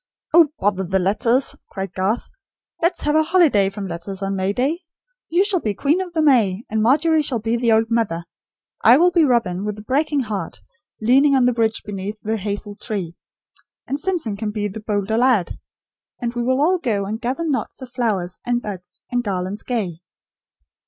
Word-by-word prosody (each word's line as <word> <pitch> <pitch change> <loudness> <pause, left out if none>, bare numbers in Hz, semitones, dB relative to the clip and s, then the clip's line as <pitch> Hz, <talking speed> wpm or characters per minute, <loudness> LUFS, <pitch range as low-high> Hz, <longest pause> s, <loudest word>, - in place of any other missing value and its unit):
"Oh, 335 -1 +7
bother 195 -1 +1
the 190 +1 0
letters!" 230 +8 +1
cried 190 -3 -5
Garth. 195 +5 -1 0.5
"Let's 340 +1 +1
have 295 +1 +1
a 315 - +6
holiday 310 - +3
from 195 0 -6
letters 185 +3 -5
on 195 0 -1
May 190 +1 0
Day! 270 +10 0 0.5
You 350 +5 +3
shall 400 -3 +1
be 210 -8 -2
Queen 300 - +1
of 365 -2 -5
the 320 -2 +1
May; 225 -8 +3
and 220 0 +1
Margery 310 +7 +3
shall 275 -4 -2
be 225 +1 -1
the 235 -1 +1
old 225 +1 +3
mother. 200 -8 0 0.6
I 235 +3 +8
will 355 +3 +4
be 345 -2 +4
Robin, 220 -8 +1
with 210 0 -3
the 210 - -10
breaking 285 +4 +1
heart, 205 -8 -4 0.4
leaning 270 +5 +4
on 260 -2 +4
the 250 - +3
bridge 225 -1 0
beneath 205 +1 -5
the 220 +1 -1
hazel 205 0 -4
tree; 190 -6 -4 0.7
and 280 - -3
Simpson 315 - -2
can 210 +1 -3
be 210 0 -2
the 205 +2 -7
'bolder 210 0 -1
lad.' 245 -8 +2 0.6
And 240 -1 -3
we 240 - -2
will 260 +2 +1
all 360 +4 +3
go 210 - -1
and 215 +4 -4
'gather 265 +7 -2
knots 280 -3 -2
of 250 - -10
flowers, 210 -8 -2
and 240 0 0
buds, 190 -6 -9
and 245 0 0
garlands 190 -1 -3
gay.'" 190 -9 -3
225 Hz, 195 wpm, -21 LUFS, 200-270 Hz, 0.7 s, I